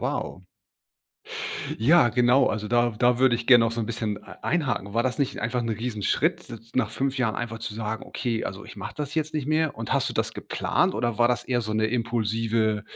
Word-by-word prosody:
wow. 95 - -3 1.4
Ja, 150 +2 +6
genau, 125 +2 +4
also, 110 -1 -2
da 120 +1 +2
da 125 0 +3
würde 130 -3 +5
ich 120 0 -7
gerne 120 -3 +7
auch 115 - +1
so 115 - -5
'n 110 - -2
bisschen 110 -2 -2
e - - -12
einhaken. 120 - -1
War 115 - +2
das 130 +1 -1
nicht 140 - -1
einfach 120 +3 -1
'n 115 - -3
Riesenschritt, 115 - -1
d 115 - -5 0.2
nach 115 -5 +1
5 135 +3 -1
Jahren 115 -5 0
einfach 115 -1 -4
zu 110 - -5
sage: 110 0 -4
„Okay, 115 -3 -2
also, 100 +1 -6
ich - - -11
mache 100 - -7
das 145 -1 -4
jetzt 155 -1 -1
nicht 150 -4 -2
mehr?“ 155 0 +1
Und 115 0 -3
hast - - +2
du - - -4
das - - -1
geplant - - 0
oder 120 -3 -1
war 120 0 +5
das 125 - 0
eher 125 -2 0
so 110 -2 -4
'ne 110 0 +2
impulsive, 115 -2 0
120 Hz, 220 wpm, -25 LUFS, 110-130 Hz, 1.4 s, gerne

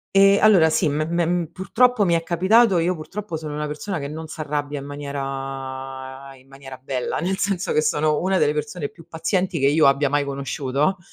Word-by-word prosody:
Ehm, 195 0 +6
allora 190 -7 +6
sì, 160 0 +1
me 150 +2 -1
me 170 +1 0
m 175 0 0
purtroppo 245 +4 +2
mi 175 -3 +2
è 165 - +1
capitato. 190 +3 +3
Io 175 +2 +1
purtroppo 175 +2 -6
sono 155 -1 -6
una 150 0 -3
persona 165 +5 -4
che 140 -1 -5
non 160 +2 -7
s'arrabbia 150 -2 -4
in 140 - -8
maniera 135 -1 -6
in 130 +1 -21
maniera 135 -1 -11
bella, 130 -1 -3
nel 190 +4 -1
senso 195 -2 -1
che 155 - +3
sono 150 0 +1
una 190 +1 +1
delle 145 - +3
persone 150 0 -4
più 165 -1 -17
pazienti 180 +2 -1
che 135 - +3
io 155 +1 +4
abbia 140 +1 +3
mai 145 0 +1
conosciuto. 140 +4 -1
155 Hz, 200 wpm, -22 LUFS, 140-180 Hz, -, Ehm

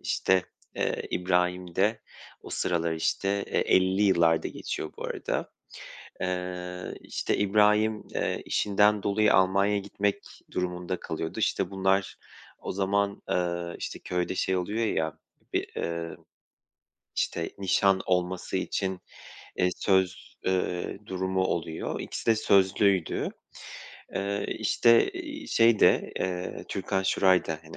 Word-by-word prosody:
işte, 95 -1 +2 0.3
eee, - - -1
İbrahim 90 -1 0
de 105 +3 +2 0.4
o - - -10
sıralar, 85 -1 0
işte, 100 +5 0
eee, - - -1
50'li 95 +2 +3
yıllarda 85 -4 +3
geçiyor 80 - -5
bu - - -7
arada. - - -3 0.7
Eee, 90 0 -4
işte, - - -2
İbrahim, 105 +1 +3
eee, - - -1
işinden 105 0 +2
dolayı 105 +1 +3
Almanya'ya 100 +2 +3
gitmek 100 0 -2 0.3
durumunda 90 0 -2
kalıyordu. 80 0 -4
İşte, 95 - 0
bunlar 95 0 +1 0.4
o - - -5
zaman, 100 +1 0
ııı, 85 -1 -1
işte, - - -5
köyde 90 +1 -2
şey 95 0 0
oluyor 105 +5 -1
ya, 80 -5 -1 0.3
bir, - - -1
ııı, 85 0 -3 1.0
işte, 85 - -1
nişan 95 0 +3
olması 90 0 0
için, 95 0 -2 0.6
eee, 90 - +2
söz, 95 -1 +1
ııı, 90 -1 -1
durumu 95 0 -1
oluyor. 85 -3 -2
İkisi - - -6
de 115 -1 +5
sözlüydü. 100 -3 +2 0.8
Eee, 100 +1 -1
işte, 115 0 +4
iii, 305 -4 -7
şey 115 -2 +4
de, - - +4
ııı, 90 -1 -3
Türkan 95 0 -1
Şoray 95 -1 +3
da, 80 -1 -3
hani, 80 0 -12
95 Hz, 125 wpm, -28 LUFS, 90-100 Hz, 1.0 s, de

